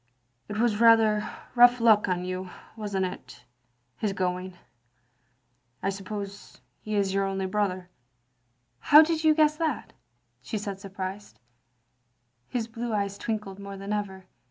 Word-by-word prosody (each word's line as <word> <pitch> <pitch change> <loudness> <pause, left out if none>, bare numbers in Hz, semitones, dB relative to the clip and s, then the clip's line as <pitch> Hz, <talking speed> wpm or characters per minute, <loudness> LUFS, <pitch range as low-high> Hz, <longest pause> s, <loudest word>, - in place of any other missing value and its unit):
It 210 - -4
was 225 -1 +1
rather 220 -2 +5 0.2
rough 245 0 +6
luck 220 -3 +5
on 180 -1 -1
you, 185 0 -4 0.3
was 210 -3 -5
n't 190 - +1
it, 180 -8 -8 0.5
his 210 -2 -1
going? 185 -1 -3 1.3
I 195 - +1
suppose 200 +1 -7 0.2
he 215 0 -4
is 195 -2 +1
yotir 195 0 +1
only 195 0 -2
brother. 185 -2 -1 0.4
" 120 -1 -46
" 120 -1 -46
How 300 +2 +10
did 320 0 -1
you 310 -1 +5
guess 305 -1 +3
that? 315 -6 -2 0.2
" 120 0 -46
she 175 - -4
said, 200 -2 -5
surprised. 195 +1 -7 1.1
His 235 -3 -2
blue 235 +1 -5
eyes 200 -1 -2
twinkled 210 -4 -4
more 200 0 -8
than 195 +2 -4
ever. 190 -3 -4
200 Hz, 155 wpm, -27 LUFS, 185-220 Hz, 1.3 s, How